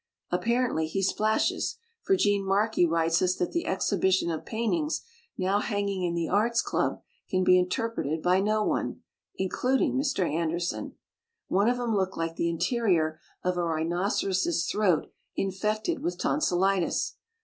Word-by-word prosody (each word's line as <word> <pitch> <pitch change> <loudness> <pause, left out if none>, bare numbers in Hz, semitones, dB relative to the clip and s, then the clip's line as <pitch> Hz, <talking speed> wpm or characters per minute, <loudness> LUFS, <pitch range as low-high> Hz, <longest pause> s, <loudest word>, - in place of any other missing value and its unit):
Apparently 235 -9 +1
he 195 +5 -2
splashes, 215 +3 +1 0.2
for 385 - +2
Gene 205 - +2
Markey 195 -1 +2
writes 165 0 +2
us 185 0 +2
that 175 - -2
the 340 - -2
exhibition 190 -2 +1
of 160 - -5
paintings 265 +8 -1 0.4
now 190 +2 +1
hanging 200 -3 -1
in 175 -1 -1
the 170 -1 -1
Arts 230 +4 +2
Club - - -1 0.3
can 185 -1 +1
be 180 - +6
inter 180 +5 0
preted 160 -8 -3
by 180 +1 +4
no 215 +2 +1
one - - -1 0.3
(including 250 +8 +1
Mr. 265 - 0
An 160 +2 0
derson): 170 +2 -3 0.6
"one 200 +5 +3
of 245 0 0
'em 235 -3 0
looked 190 -1 -1
like 165 0 -2
the 170 - 0
interior 170 -4 +1 0.2
of 180 0 0
a 175 - +1
rhinoceros's 180 - 0
throat 190 -7 +2 0.3
in 195 - 0
fected 215 - -1
with 340 +5 -3
tonsilitis. 195 - +1
195 Hz, 155 wpm, -28 LUFS, 175-220 Hz, 0.6 s, be